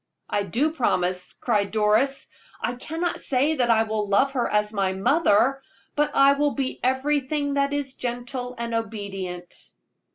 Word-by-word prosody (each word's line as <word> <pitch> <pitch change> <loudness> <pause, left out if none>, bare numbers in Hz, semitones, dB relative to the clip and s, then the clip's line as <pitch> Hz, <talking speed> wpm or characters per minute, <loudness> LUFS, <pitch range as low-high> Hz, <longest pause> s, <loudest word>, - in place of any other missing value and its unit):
"I 205 - 0
do 240 - 0
promise," 180 - 0
cried 210 -4 0
Doris. 220 +6 +2 0.3
"I - - -2
cannot 325 +7 -3
say 285 +4 +1
that 245 -2 +2
I 225 -1 +5
will 215 -2 -2
love 265 +8 +3
her 255 -3 0
as 210 0 +1
my 195 -2 0
mother, 265 - +3 0.3
but 295 0 +2
I 275 0 +6
will 290 0 0
be 270 -2 -2
everything 285 +2 0
that 280 0 +1
is 285 -2 -2
gentle 245 +1 -4
and 235 0 -4
obedient." 195 -5 -4
245 Hz, 155 wpm, -24 LUFS, 210-280 Hz, 0.3 s, I